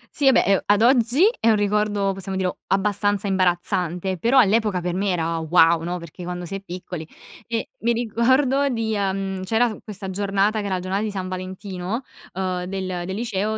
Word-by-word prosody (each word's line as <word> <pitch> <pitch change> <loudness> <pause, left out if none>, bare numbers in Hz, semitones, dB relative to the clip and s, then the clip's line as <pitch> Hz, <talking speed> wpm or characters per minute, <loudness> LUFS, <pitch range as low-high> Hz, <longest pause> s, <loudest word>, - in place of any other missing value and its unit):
Sì, 285 - +2
vabbè, 265 - +6
ehm, 195 -1 +3
ad 205 +2 +4
oggi 245 +5 +4 0.2
è 230 - +3
un 220 - +5
ricordo, 205 -1 +1
possiamo 190 0 -5
dirlo, 185 -1 -2
abbastanza 205 +1 +1
imbarazzante, 180 -1 0
però 245 +7 +3
all'epoca 215 -4 +4
per 175 0 -2
me 195 +2 0
era 165 -2 0
wow, 165 0 +4
no? 175 +2 -3
Perché, 170 +1 -10
quando 175 0 -5
si 185 - -8
è 195 - -4
piccoli 180 -3 -7 0.4
e 230 -1 -3
mi 235 +1 +1
ricordo 260 +5 +2
di, 225 -3 -1
uhm, 195 -1 -2
c'era 225 +5 +2
s 215 - -7
questa 195 -3 -7
giornata, 200 +2 +1
che 205 - -3
era 190 -1 0
giornata 185 +2 -2
di 215 - -1
San 190 -2 -4
Valentino, 185 +3 -5 0.3
uhm, 185 -1 -2
del 190 +1 -4 0.2
del 190 - -3
liceo, 215 -1 -2
195 Hz, 190 wpm, -23 LUFS, 185-220 Hz, 0.4 s, vabbè